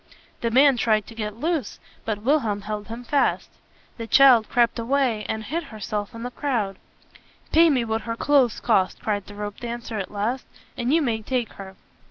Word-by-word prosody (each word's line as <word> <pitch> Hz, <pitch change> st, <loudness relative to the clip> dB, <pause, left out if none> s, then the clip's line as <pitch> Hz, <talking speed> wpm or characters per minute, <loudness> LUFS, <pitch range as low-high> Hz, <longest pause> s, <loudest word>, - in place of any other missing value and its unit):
The 230 Hz, -, -1 dB
man 265 Hz, +2 st, +5 dB
tried 215 Hz, -3 st, +2 dB
to -, -, -12 dB
get 210 Hz, -2 st, -4 dB
loose; 315 Hz, +2 st, -2 dB, 0.3 s
but 210 Hz, -2 st, -3 dB
Wilhelm 230 Hz, -7 st, +1 dB
held 210 Hz, 0 st, -5 dB
him 230 Hz, +2 st, -7 dB
fast. 280 Hz, +3 st, 0 dB, 0.5 s
The 230 Hz, -1 st, -6 dB
child 250 Hz, -4 st, +6 dB
crept 235 Hz, -1 st, +2 dB
away, 235 Hz, -3 st, 0 dB
and 220 Hz, 0 st, -2 dB
hid 325 Hz, +8 st, -3 dB
herself 210 Hz, -3 st, -5 dB
in 230 Hz, -, -7 dB
the 245 Hz, -, -4 dB
crowd. 230 Hz, -10 st, -2 dB, 0.7 s
"Pay 330 Hz, +1 st, +6 dB
me 255 Hz, -5 st, +1 dB
what 220 Hz, 0 st, -1 dB
her 230 Hz, -, -1 dB
clothes 265 Hz, -3 st, +2 dB
cost," 195 Hz, -6 st, +1 dB
cried 205 Hz, -2 st, -2 dB
the 205 Hz, -, -11 dB
ropedancer 225 Hz, +2 st, -5 dB
at 190 Hz, -, -4 dB
last, 215 Hz, +5 st, -3 dB, 0.3 s
"and 245 Hz, +1 st, -1 dB
you 325 Hz, +1 st, +3 dB
may 225 Hz, -4 st, -1 dB
take 245 Hz, 0 st, -2 dB
her." 190 Hz, -1 st, -10 dB
230 Hz, 185 wpm, -24 LUFS, 210-260 Hz, 0.7 s, child